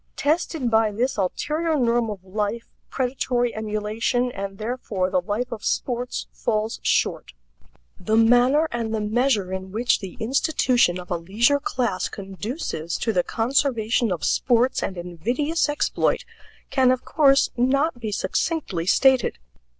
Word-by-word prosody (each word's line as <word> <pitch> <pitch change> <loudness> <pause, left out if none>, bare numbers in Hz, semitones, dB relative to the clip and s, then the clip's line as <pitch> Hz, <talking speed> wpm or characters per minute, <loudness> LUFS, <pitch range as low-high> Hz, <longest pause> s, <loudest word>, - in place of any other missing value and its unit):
Tested 300 -4 0
by 220 -1 +3
this 245 +6 -1
ulterior 305 - -1
norm 235 -3 +1
of 200 -3 -6
life, 210 +4 -3 0.2
predatory 245 -2 -1
emulation, 220 +3 -1
and 195 -3 -6
therefore 215 -5 -2
the 185 - +2
life 210 +7 -3
of 225 -2 -6
sports, 245 0 -2
falls 220 -1 -2
short. - - 0 0.7
The 215 +4 +1
manner 245 +7 +4
and 230 -2 -2
the - - -1
measure 210 -3 +1
in 190 0 -5
which 235 +4 +1
the 190 -3 -8
institution 245 - +2
of 180 0 -10
a 175 - +1
leisure 220 +12 +2
class 240 -9 -1
conduces 195 - -5
to 225 - -1
the 180 - +3
conservation 235 0 0
of 170 -5 -3
sports 245 - +2
and 190 - -3
invidious 240 - -1
exploit 295 - 0 0.5
can 260 -2 +4
of 255 0 +1
course 275 -3 +4
not 270 +3 +1
be 220 -3 -4
succinctly 200 - -2
stated. 260 - +3
230 Hz, 140 wpm, -23 LUFS, 200-255 Hz, 0.7 s, manner